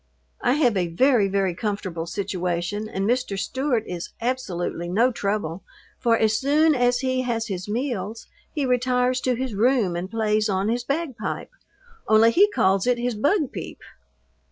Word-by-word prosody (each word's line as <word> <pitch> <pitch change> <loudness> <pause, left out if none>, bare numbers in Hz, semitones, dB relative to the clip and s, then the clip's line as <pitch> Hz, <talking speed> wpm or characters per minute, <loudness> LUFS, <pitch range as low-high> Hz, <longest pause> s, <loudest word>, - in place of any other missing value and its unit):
I 245 - +3
have 260 -7 +2
a 180 -2 +1
very, 220 +4 +3
very 195 -2 0
comfortable 185 -4 -3
situation 185 +2 -3
and 195 0 -2
Mr. 245 -4 0
Stewart 250 +4 -1
is 175 -1 -5
absolutely 190 -8 -3
no 230 +8 +3
trouble, 200 -6 -2 0.4
for 230 -2 +3
as 220 -1 +2
soon 305 +3 +3
as 245 -1 +2
he 255 -1 0
has 230 -3 -2
his 185 0 -4
meals 230 -2 -3 0.3
he 290 -3 -1
retires 250 0 +1
to 255 -1 +1
his 255 -1 -3
room 220 -4 +2
and 175 +2 -4
plays 215 -1 +1
on 195 +1 0
his 240 +1 -1
bagpipe, 280 - -3 0.6
only 220 +1 +6
he 405 - +5
calls 195 - +2
it 250 -1 +3
his 245 0 -1
"bugpeep." 290 - -1
225 Hz, 155 wpm, -24 LUFS, 195-255 Hz, 0.6 s, only